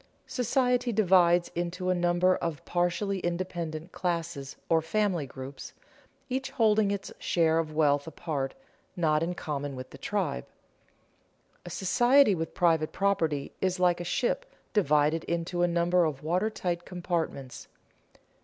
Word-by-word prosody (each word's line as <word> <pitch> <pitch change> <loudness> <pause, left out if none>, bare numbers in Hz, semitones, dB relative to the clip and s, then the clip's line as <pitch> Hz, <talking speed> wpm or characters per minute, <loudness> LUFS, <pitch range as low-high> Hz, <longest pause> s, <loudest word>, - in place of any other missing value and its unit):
Society 250 -1 +1
divides 180 -5 +4
into 180 +2 -2
a - - +4
number 175 +1 +3
of 160 -4 -4
partially 180 +3 0
independent 170 -2 -3
classes 170 -6 -3
or 165 -1 +3
family 180 -3 0
groups, 130 +2 -9 0.5
each 260 +1 -2
holding 220 -5 +3
its 200 -1 -4
share 165 -1 +2
of 155 -2 -3
wealth 145 -2 +2
apart, 145 -4 -3 0.4
not 155 -3 +2
in 175 +2 -1
common 145 -4 -4
with 130 0 -8
the - - -12
tribe. 60 - -2 1.2
A - - -5
society 240 +5 +4
with 165 -2 -4
private 165 -3 +2
property 165 -8 0
is 185 -1 0
like 180 -1 +3
a - - -3
ship 260 - -1 0.3
divided 155 -4 +3
into 170 +1 -2
a 175 - +4
number 175 +1 +2
of 150 -3 -3
water 180 +7 +1
tight 175 -5 -3
compartments. 170 -7 -4
175 Hz, 135 wpm, -28 LUFS, 160-190 Hz, 1.2 s, divides